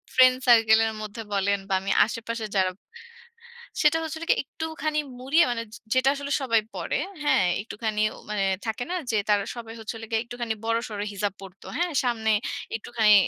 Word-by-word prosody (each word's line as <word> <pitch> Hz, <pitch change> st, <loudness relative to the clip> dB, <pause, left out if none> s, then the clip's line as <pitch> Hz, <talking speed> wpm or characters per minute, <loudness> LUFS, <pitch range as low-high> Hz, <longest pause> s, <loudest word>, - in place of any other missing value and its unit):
Friend 255 Hz, 0 st, +7 dB
circle 225 Hz, -2 st, +7 dB
এর 220 Hz, -, -3 dB
মধ্যে 215 Hz, +2 st, -6 dB
বলেন 200 Hz, 0 st, +2 dB
বা 195 Hz, -, +1 dB
আমি 195 Hz, +1 st, -2 dB
আশেপাশে 230 Hz, -1 st, -4 dB
যারা 185 Hz, -1 st, +3 dB, 1.1 s
সেটা 305 Hz, +1 st, +5 dB
হচ্ছিল 320 Hz, +1 st, -5 dB
কি -, -, +8 dB
একটুখানি 310 Hz, +1 st, -3 dB, 0.2 s
মুড়িয়ে 280 Hz, +7 st, +4 dB
মানে, 235 Hz, -1 st, -2 dB
যে -, -, -8 dB, 0.2 s
যেটা 255 Hz, +1 st, +4 dB
আসলে 285 Hz, 0 st, -5 dB
সবাই 230 Hz, -4 st, +3 dB
পড়ে। -, -, -2 dB, 0.3 s
হ্যাঁ, 245 Hz, -10 st, +4 dB, 0.2 s
একটুখানি 215 Hz, 0 st, -3 dB, 0.3 s
মানে 210 Hz, -2 st, 0 dB, 0.2 s
থাকে 225 Hz, +2 st, -2 dB
না? 365 Hz, -, 0 dB, 0.2 s
যে -, -, 0 dB
তারা 205 Hz, -1 st, +4 dB
সবাই 230 Hz, -2 st, -7 dB
হচ্ছে 220 Hz, +1 st, -5 dB
হলো 225 Hz, -, -7 dB
গিয়ে 220 Hz, 0 st, +2 dB
একটুখানি 235 Hz, -1 st, -3 dB
বড়সড় 230 Hz, -2 st, -1 dB
হিজাব 200 Hz, -1 st, -1 dB
পড়তো। 195 Hz, 0 st, -12 dB
হ্যাঁ? 350 Hz, 0 st, 0 dB
সামনে 230 Hz, -3 st, 0 dB, 0.5 s
একটুখানি 220 Hz, -1 st, +3 dB
230 Hz, 170 wpm, -26 LUFS, 210-255 Hz, 1.1 s, কি